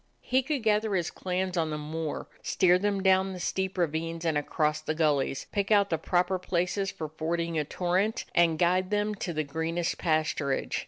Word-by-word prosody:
He 260 +1 +2
could 275 -2 -2
gather 215 -1 +2
his 175 -2 -1
clans 185 0 -2
on 160 -2 +1
the 150 - -3
moor, 155 +1 -4
steer 180 0 +3
them 200 -1 0
down 190 0 +3
the 180 - -7
steep 190 +1 -2
ravines 165 0 -1
and 160 -2 +1
across 150 +1 0
the 155 - -2
gullies, 145 -4 +1
pick 200 -2 -1
out 200 -2 +4
the 165 - +1
proper 180 +2 +1
places 180 +2 -1
for 155 - -5
fording 165 +1 -2
a - - +1
torrent, 185 +7 0
and 170 -2 +4
guide 180 +2 +2
them 210 0 0
to 195 -3 -4
the 155 -1 -1
greenest 165 +3 -2
pasturage. 155 -4 0
175 Hz, 190 wpm, -28 LUFS, 160-190 Hz, -, out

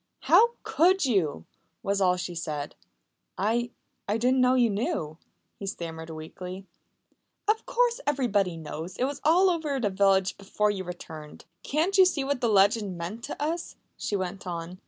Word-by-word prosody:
"How 470 +1 +5
could 365 +1 +3
you?" 170 - 0 0.4
was 200 0 0
all 180 -1 +3
she 175 0 -4
said. 155 -4 -4 0.6
"I 235 +5 +1 0.4
I 205 +2 +1
didn't 255 +3 +3
know 255 0 +4
you 240 -3 +4
knew," 160 -7 -2 0.4
he 200 - -5
stammered 165 -4 -6
weakly. 180 +4 -8 0.8
"Of 440 +3 +1
course - - +1
everybody 205 -11 +1
knows! 160 +3 -7
It - - 0
was 280 +2 -2
all 360 +5 +5
over 305 -5 -1
the 210 -5 0
village 190 -1 +3
before 210 +1 0
you 195 -2 -4
returned. 160 -3 -9 0.2
"Can't 345 +7 +1
you 375 - +9
see 300 -6 -1
what 275 -2 -1
that 240 - +2
legend 200 -2 +3
meant 185 +8 -6
to - - -7
us?" 325 +3 -2 0.2
she 205 - -3
went 190 0 -4
on. 175 +1 -5
200 Hz, 165 wpm, -27 LUFS, 180-275 Hz, 0.8 s, you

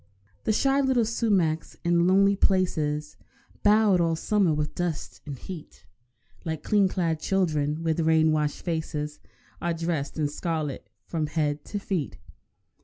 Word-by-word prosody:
The - - +2
shy 270 +5 +3
little 260 -4 +2
sumacs, 195 -8 0
in 170 0 +3
lonely 200 +2 +5
places, 155 -6 0 0.4
Bowed 210 -3 +4
all 165 -1 +2
summer 195 +1 +2
with 150 0 -1
dust 175 -4 -4
and 140 -2 -5
heat, 170 +2 -10 0.6
Like 160 -2 -4
clean 205 -2 +3
clad 170 -4 -1
children 155 -5 0
with 160 0 0
rain 160 -1 +4
washed 150 -1 -1
faces, 155 -3 -3 0.4
Are 170 -1 0
dressed 165 -4 -2
in 150 -2 +1
scarlet 150 -2 -3 0.2
from 160 -3 -2
head 150 -1 -1
to 205 - -4
feet. 190 -7 -3
165 Hz, 140 wpm, -26 LUFS, 150-190 Hz, 0.6 s, lonely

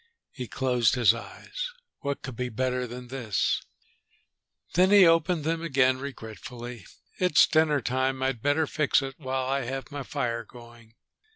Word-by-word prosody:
He 125 -4 -6
closed 125 0 +1
his 115 -4 +5
eyes. - - -6 0.3
"What 140 0 -3
could 130 - -6
be 125 +1 -3
better 125 +2 -1
than 125 +1 -9
this?" 120 -6 0 1.1
Then 185 +2 +4
he 200 -2 +8
opened 165 0 +3
them 165 +1 -1
again 130 -5 +2
regretfully. 120 -3 -8 0.3
"It's 180 -4 +5
dinner 155 -3 +2
time. 130 +2 0
I'd 130 -4 -1
better 145 +4 +2
fix 145 -2 +2
it 135 0 -5
while 130 -2 -2
I 135 +1 0
have 135 +3 -5
my 145 0 -4
fire 115 -2 -2
going." 115 -1 -15
130 Hz, 155 wpm, -27 LUFS, 120-145 Hz, 1.1 s, he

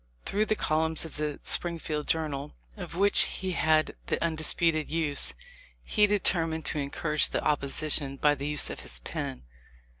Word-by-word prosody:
Through 210 +2 0
the 215 - +1
columns 160 -2 0
of 160 - -8
the 150 -1 -3
Springfield 160 -3 0
Journal, 150 -3 -2 0.2
of - - -8
which 200 +3 +4
he 190 -1 -4
had 155 -2 +1
the - - -1
undisputed 160 -1 0
use, 155 -3 +2 0.5
he 210 -2 +3
determined 165 -6 +1
to 150 - 0
encourage 150 +2 -1
the - - -2
opposition 140 -1 +1
by 145 +1 +3
the 140 0 -5
use 150 0 +2
of - - -6
his - - -7
pen. 65 - -5
155 Hz, 155 wpm, -28 LUFS, 150-165 Hz, 0.5 s, which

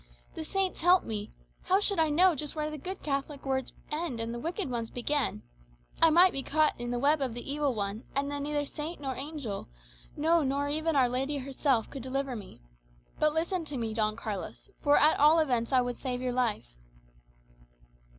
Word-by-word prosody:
The 320 - -5
saints 380 +2 -1
help 355 +2 +5
me! 210 -1 -4 0.3
How 380 +1 +3
should 400 -3 +3
I 320 -1 +3
know 355 +5 +5
just 295 0 -4
where 305 0 -2
the 305 - -5
good 375 +6 -6
Catholic 280 0 -3
words 265 -1 -1 0.2
end, 300 -6 -2
and 230 +1 -3
the 240 - -4
wicked 340 - -3
ones 235 -3 -3
begin? 250 - -1 0.6
I 330 - +8
might 355 +4 +6
be 275 - -1
caught 305 +3 +2
in 240 - -3
the 245 - -1
web 285 +4 +2
of 255 -4 -1
the 245 +3 -5
evil 290 -4 0
one; 205 +1 -3
and 280 +1 0
then 285 0 -3
neither 290 0 -1
saint 310 +4 -6
nor 270 -2 -3
angel, 275 - -5 0.5
no, 325 +3 +3
nor 280 0 0
even 315 +2 0
Our 260 -3 +5
Lady 265 +4 -1
herself, 265 -3 0
could 270 - -6
deliver 265 +1 -2
me. 200 - -10 0.6
But 305 0 +2
listen 340 +2 0
to 290 -3 -5
me, 225 -2 -2
Don 215 -1 0
Carlos, 215 -3 -6
for 290 0 +4
at 305 +2 +4
all 300 +3 +6
events 250 -7 +1
I 260 -1 +5
would 245 0 -3
save 250 -2 -3
your 250 -1 -2
life." 225 - -1
280 Hz, 200 wpm, -29 LUFS, 245-310 Hz, 0.6 s, I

